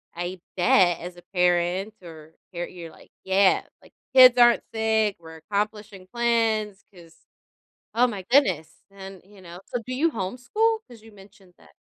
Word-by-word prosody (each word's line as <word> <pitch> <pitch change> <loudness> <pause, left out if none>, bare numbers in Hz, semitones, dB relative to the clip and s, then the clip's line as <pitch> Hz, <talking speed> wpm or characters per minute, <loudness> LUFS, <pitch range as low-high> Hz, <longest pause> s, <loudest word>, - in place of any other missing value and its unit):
I 175 +1 -5 0.2
bet, 175 -1 +3
as 175 +1 -8
a 175 - -15
parent 180 +3 0
or 160 -1 -13 0.2
you're 175 0 -4
you're 170 -3 -11
like, - - -19 0.2
"Yeah," 190 0 +3 0.2
like, - - -21 0.2
"kids 255 -1 +8
aren't 240 -1 +5
sick, 220 -2 +1
we're 160 -1 -13
accomplishing 205 +2 -5
plans, 225 -4 0
'cause" 165 -2 -17 0.8
Oh 245 +1 +4
my 205 -5 -6
goodness, 190 - +2 0.2
and, 195 -2 -11
you 200 -1 -18
know? 175 0 -11
So, 245 - -4
do 255 - -5
you 320 +4 +1
homeschool? 255 - -1
'Cause 235 -3 -15
you 225 0 -16
mentioned 195 -2 -19
that. - - -22
195 Hz, 160 wpm, -24 LUFS, 175-225 Hz, 0.8 s, kids